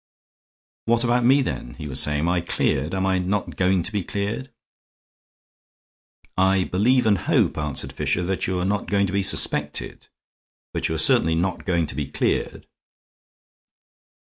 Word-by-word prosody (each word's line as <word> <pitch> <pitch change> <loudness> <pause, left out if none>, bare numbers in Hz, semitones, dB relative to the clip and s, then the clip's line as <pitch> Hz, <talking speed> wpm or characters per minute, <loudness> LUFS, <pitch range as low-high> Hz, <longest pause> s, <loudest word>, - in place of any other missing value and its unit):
"What 115 +1 +2
about 120 0 +2
me, 135 +3 +5
then?" - - -5
he 75 - -7
was 65 - 0
saying. 75 -1 +1
"Am 85 - 0
I 90 0 +1
cleared? 80 -1 -1
Am 95 0 0
I 95 -1 +1
not 95 +3 -2
going 90 -1 +2
to 100 - -1
be 100 -3 -2
cleared?" 105 +8 -4 1.9
"I 95 0 +3
believe 120 +8 +2
and 105 -4 +3
hope," - - +1
answered 75 -3 -3
Fisher, 90 - -1
"that 95 +1 -2
you 90 -1 -1
are 90 - -1
not 100 +1 -1
going 100 -1 +2
to 95 - -4
be 100 - +1
suspected. 75 -6 0 0.7
But - - -1
you 80 - -2
are - - -1
certainly 80 +1 +3
not 90 +4 -2
going 85 -4 +1
to - - -3
be 75 -1 -3
cleared. 70 - -2
95 Hz, 170 wpm, -23 LUFS, 80-100 Hz, 1.9 s, me